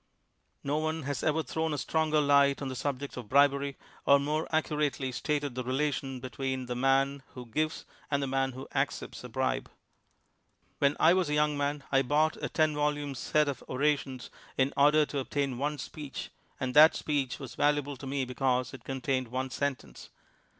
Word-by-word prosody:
No 145 +2 0
one 155 0 -2
has 140 -2 -3
ever 155 +1 +1
thrown 160 -1 -2
a - - -4
stronger 155 +1 +1
light 140 -1 +4
on 140 - -4
the 130 - -5
subject 140 +1 -3
of 120 -4 -7
bribery, 140 +1 +3 0.3
or 140 - +8
more 150 +3 -1
accu 155 -1 0
rately 140 -3 -1
stated 145 +2 -1
the 125 +1 -3
relation 135 0 -1
between 130 0 -3
the 125 0 -4
man 135 +2 +2
who 125 -1 -7
gives 155 +7 -2 0.2
and 140 -1 +1
the - - +1
man 135 0 0
who 130 +2 -8
accepts - - -2
a - - -8
bribe. - - -1 1.1
When 140 0 +2
I 165 - +6
was 185 -4 +1
a 150 - +1
young 150 0 +2
man 145 0 -1
I 135 -1 +5
bought 150 +4 +2
a - - -2
ten 155 -1 +2
vol 150 0 +1
ume 145 -1 -4
set 150 +4 +1
of 140 -3 -3
orations 135 -2 -1 0.3
in 135 +1 +2
order 150 +2 +5
to 145 - -3
obtain 135 -2 -2
one 145 +2 -1
speech, 145 +1 -7 0.3
and 130 -1 -2
that 155 +3 +8
speech 140 -4 -1
was 135 -3 -8
valuable 145 -1 +1
to 135 - -8
me 135 0 -1
because 125 0 0
it 130 -3 -10
contained 130 -1 -2
one 130 +2 -3
sentence. 130 - -4
140 Hz, 190 wpm, -30 LUFS, 130-150 Hz, 1.1 s, or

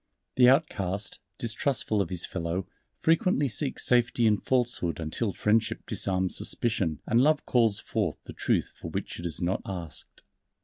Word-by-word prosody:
The 125 -1 +7
outcast, 100 - 0 0.2
distrustful 115 -2 0
of 90 - -2
his 90 -2 0
fellow, 85 +1 -3 0.4
frequently 165 -3 +3
seeks 135 +3 0
safety 120 -1 +3
in 105 -2 +3
falsehood 120 - 0
until 85 +7 -2
friendship 110 +3 0
disarms 95 -2 -1
suspicion 95 -10 0
and 115 +2 +3
Love 150 +2 +3
calls 115 -5 +3
forth 105 -8 -2
the - - -10
Truth - - 0
for - - -8
which - - -5
it 85 - -7
has 85 0 -2
not 90 +2 0
asked. 85 -5 -8
105 Hz, 150 wpm, -28 LUFS, 90-125 Hz, 0.4 s, The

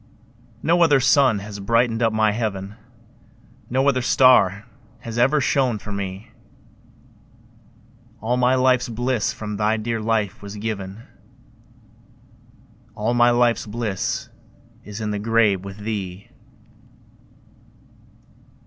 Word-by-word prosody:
No 170 +2 +2
other 150 -5 +5
sun 130 -3 +4
has 105 -1 -8
brightened 115 +3 +1
up 115 -1 +2
my 110 -1 +2
heaven, 105 -3 -3 1.0
No 130 +3 +1
other 130 -2 +2
star 110 -6 +4 0.4
has 115 0 -5
ever 135 +5 +3
shone 130 -3 +1
for 105 +1 -9
me; 100 +2 -6 1.9
All 115 +3 -1
my 125 +1 +3
life's 130 -1 +2
bliss 120 0 -1
from 105 -1 -6
thy 110 +1 +1
dear 115 +1 -3
life 110 -3 -1
was 100 0 -8
given, 105 -1 -5 1.9
All 110 +2 -1
my 120 0 +4
life's 120 -2 +2
bliss 105 -3 -3 0.5
is 105 +2 -8
in 105 -1 -2
the 105 - -3
grave 105 -3 +2
with 100 0 -9
thee. 100 -3 -6
110 Hz, 115 wpm, -22 LUFS, 105-120 Hz, 1.9 s, other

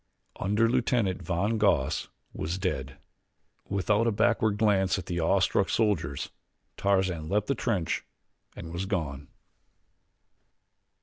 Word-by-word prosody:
Underlieutenant 115 -1 +1
von 95 +6 0
Goss 100 -11 +2 0.2
was 85 +4 -3
dead. 70 -8 -3 0.7
Without 105 +3 +1
a - - +3
backward 110 -1 +2
glance 100 -3 +3
at 95 - -5
the 90 -1 -2
awe 95 +4 +3
struck 95 +1 +2
soldiers 85 - 0 0.4
Tarzan 95 -5 0
leaped 105 +2 +1
the 140 - +1
trench 110 -9 -1 0.5
and 80 -1 -8
was 90 +2 -3
gone. 75 -8 -3
95 Hz, 115 wpm, -28 LUFS, 85-105 Hz, 0.7 s, a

